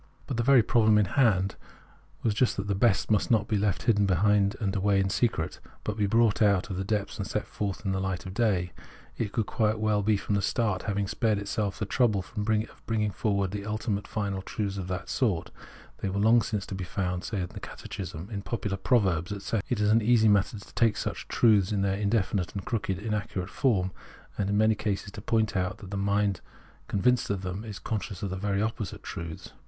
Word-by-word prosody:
But 130 Hz, -, -3 dB
the -, -, +2 dB
very 125 Hz, -1 st, +6 dB
problem 110 Hz, -2 st, +4 dB
in 105 Hz, -, +4 dB
hand 100 Hz, -8 st, +3 dB, 0.7 s
was 110 Hz, -, +2 dB
just 120 Hz, +4 st, +1 dB
that 100 Hz, -, -2 dB
the 100 Hz, -, 0 dB
best 100 Hz, +1 st, +2 dB
must 105 Hz, -, +2 dB
not 110 Hz, -3 st, +3 dB
be 110 Hz, -, 0 dB
left 100 Hz, -2 st, 0 dB, 0.2 s
behind 100 Hz, +2 st, +3 dB
hidden 100 Hz, -3 st, -2 dB
away 100 Hz, 0 st, +2 dB
in 95 Hz, 0 st, +1 dB
secret, 110 Hz, -9 st, 0 dB, 0.2 s
but 105 Hz, -, -2 dB
be 105 Hz, -2 st, +1 dB
brought 115 Hz, +1 st, +3 dB
out 100 Hz, -1 st, +3 dB
of 90 Hz, -, -3 dB
the 95 Hz, -, -1 dB
depths 100 Hz, 0 st, -2 dB
and -, -, -2 dB
set -, -, -2 dB
forth 100 Hz, +1 st, -4 dB
in 95 Hz, -, +1 dB
the 95 Hz, -, 0 dB
light 95 Hz, -2 st, -3 dB
of 95 Hz, -, -6 dB
day. 95 Hz, -6 st, +1 dB, 0.5 s
It 110 Hz, -3 st, -1 dB
could 110 Hz, 0 st, 0 dB
quite 110 Hz, 0 st, +1 dB
well 105 Hz, -1 st, +1 dB
from 105 Hz, 0 st, +1 dB
the 100 Hz, -, +2 dB
start 105 Hz, -3 st, 0 dB
have 100 Hz, -, -1 dB
spared 110 Hz, +1 st, +1 dB
itself 100 Hz, 0 st, -2 dB
this 105 Hz, -, -3 dB
trouble 105 Hz, -5 st, +2 dB
of 110 Hz, +1 st, 0 dB
bringing 105 Hz, -2 st, 0 dB
forward 100 Hz, -1 st, -1 dB
ultimate 105 Hz, -1 st, -1 dB
and -, -, -12 dB
final 100 Hz, -3 st, -2 dB
truths 100 Hz, 0 st, -3 dB
of 95 Hz, -2 st, -4 dB
that 90 Hz, 0 st, -4 dB
sort; 100 Hz, -11 st, 0 dB, 0.5 s
they 100 Hz, -, -2 dB
were 95 Hz, -, -3 dB
long 115 Hz, +3 st, +5 dB
since 105 Hz, -2 st, -2 dB
to -, -, -7 dB
be 95 Hz, -1 st, -4 dB
found, 90 Hz, -1 st, -2 dB
say, 105 Hz, -, -3 dB
in 90 Hz, -, -3 dB
the -, -, -8 dB
Catechism, 90 Hz, -2 st, -7 dB
in 100 Hz, -2 st, -3 dB
popular 105 Hz, -2 st, -3 dB
proverbs, 95 Hz, -6 st, +2 dB
etc. 100 Hz, +1 st, -2 dB
It 125 Hz, -, 0 dB
is 105 Hz, 0 st, +3 dB
an 115 Hz, +1 st, +5 dB
easy 110 Hz, 0 st, +4 dB
matter 105 Hz, +1 st, +3 dB
to 100 Hz, -, -13 dB
take 115 Hz, -3 st, +2 dB
such -, -, -4 dB
truths 105 Hz, -4 st, +4 dB
in 100 Hz, -2 st, +1 dB
their 95 Hz, -1 st, +1 dB
indefinite 100 Hz, -3 st, 0 dB
and 100 Hz, -, -4 dB
crooked 100 Hz, -5 st, -1 dB
inaccurate 105 Hz, -3 st, -3 dB
form, 100 Hz, -9 st, +1 dB, 0.4 s
and 100 Hz, -1 st, -1 dB
in 100 Hz, -, +1 dB
many 110 Hz, +1 st, +4 dB
cases 105 Hz, -1 st, -3 dB
to 105 Hz, -, -8 dB
point 110 Hz, -1 st, +1 dB
out 95 Hz, +2 st, -1 dB
that 100 Hz, -3 st, -11 dB
the -, -, -3 dB
mind 100 Hz, -1 st, +1 dB, 0.5 s
convinced 125 Hz, +5 st, +2 dB
of 100 Hz, -2 st, -2 dB
them 95 Hz, +3 st, -4 dB
is 105 Hz, -3 st, -7 dB
conscious 105 Hz, -3 st, -4 dB
of 100 Hz, -, -2 dB
the -, -, -2 dB
very 100 Hz, +1 st, 0 dB
opposite 110 Hz, -3 st, -4 dB
truths. 80 Hz, -1 st, -7 dB
100 Hz, 220 wpm, -28 LUFS, 95-110 Hz, 0.7 s, very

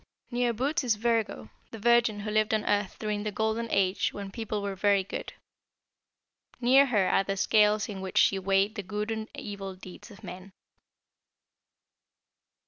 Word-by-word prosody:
"Near 245 Hz, 0 st, +1 dB
Bootes 275 Hz, +8 st, -1 dB
is 235 Hz, -4 st, +2 dB
Virgo, 225 Hz, -, -1 dB, 0.2 s
the 225 Hz, -, -9 dB
Virgin 235 Hz, -1 st, +3 dB
who 210 Hz, +1 st, -4 dB
lived 215 Hz, 0 st, +2 dB
on 215 Hz, -, -2 dB
Earth 205 Hz, -2 st, 0 dB
during 210 Hz, -1 st, -2 dB
the 210 Hz, 0 st, -3 dB
Golden 220 Hz, +2 st, -1 dB
Age 190 Hz, 0 st, +1 dB
when 200 Hz, -1 st, -7 dB
people 215 Hz, -1 st, -4 dB
were 200 Hz, -1 st, -2 dB
very 200 Hz, 0 st, +2 dB
good. 185 Hz, -, -6 dB, 1.3 s
Near 265 Hz, +3 st, +5 dB
her 205 Hz, -7 st, +2 dB
are -, -, +3 dB
the 195 Hz, 0 st, -3 dB
scales 210 Hz, +2 st, +3 dB
in 195 Hz, -3 st, -6 dB
which 190 Hz, -1 st, -5 dB
she 195 Hz, -, +4 dB
weighed 195 Hz, +2 st, +1 dB
the 205 Hz, -, -4 dB
good 210 Hz, +3 st, -4 dB
and 220 Hz, 0 st, -4 dB
evil 195 Hz, -2 st, -6 dB
deeds 185 Hz, +4 st, -12 dB
of 210 Hz, 0 st, -15 dB
men." 185 Hz, +1 st, -9 dB
210 Hz, 165 wpm, -28 LUFS, 195-225 Hz, 1.3 s, Near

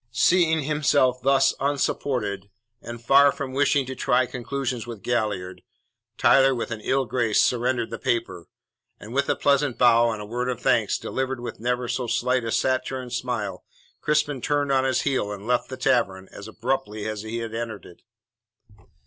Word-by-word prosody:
Seeing 160 Hz, +5 st, +3 dB
himself 140 Hz, -3 st, +2 dB
thus 135 Hz, +1 st, +3 dB
unsupported, 130 Hz, -7 st, -1 dB, 0.3 s
and 120 Hz, 0 st, -8 dB
far 140 Hz, +2 st, +6 dB
from 135 Hz, -2 st, -6 dB
wishing 140 Hz, 0 st, +2 dB
to 130 Hz, -, -5 dB
try 130 Hz, -1 st, +1 dB
conclusions 125 Hz, -1 st, -4 dB
with 115 Hz, -4 st, -8 dB
Galliard, 105 Hz, -6 st, -2 dB, 0.6 s
Tyler 135 Hz, -1 st, +5 dB
with 120 Hz, -, -4 dB
an 110 Hz, -1 st, -5 dB
ill 135 Hz, +4 st, 0 dB
grace 115 Hz, -2 st, +2 dB
surrendered 120 Hz, -1 st, 0 dB
the 115 Hz, -, -5 dB
paper; 115 Hz, -8 st, -2 dB, 0.5 s
and, 110 Hz, +3 st, -10 dB
with 140 Hz, +1 st, 0 dB
a -, -, +2 dB
pleasant 140 Hz, -2 st, +1 dB
bow 120 Hz, -1 st, +5 dB
and 110 Hz, -2 st, -3 dB
a 105 Hz, -, -6 dB
word 120 Hz, +4 st, -3 dB
of 125 Hz, -, -3 dB
thanks, -, -, +2 dB
delivered 130 Hz, -1 st, -3 dB
with 120 Hz, -1 st, -7 dB
never 125 Hz, +1 st, -1 dB
so 125 Hz, 0 st, -2 dB
slight 125 Hz, +2 st, 0 dB
a 115 Hz, -, -3 dB
saturnine 130 Hz, 0 st, -1 dB
smile, 120 Hz, -5 st, -3 dB, 0.4 s
Crispin 150 Hz, -3 st, 0 dB
turned 145 Hz, 0 st, 0 dB
on 135 Hz, -1 st, +2 dB
his 130 Hz, -1 st, +1 dB
heel 130 Hz, -7 st, -1 dB
and 100 Hz, 0 st, -7 dB
left 125 Hz, 0 st, 0 dB
the 130 Hz, -, -6 dB
tavern 120 Hz, -8 st, 0 dB
as 100 Hz, -, -10 dB
abruptly 110 Hz, -2 st, -3 dB
as 110 Hz, -1 st, -4 dB
he 110 Hz, +2 st, -5 dB
had 115 Hz, -1 st, -5 dB
entered 115 Hz, -2 st, -5 dB
it. 85 Hz, -, -15 dB
125 Hz, 175 wpm, -24 LUFS, 115-135 Hz, 0.6 s, far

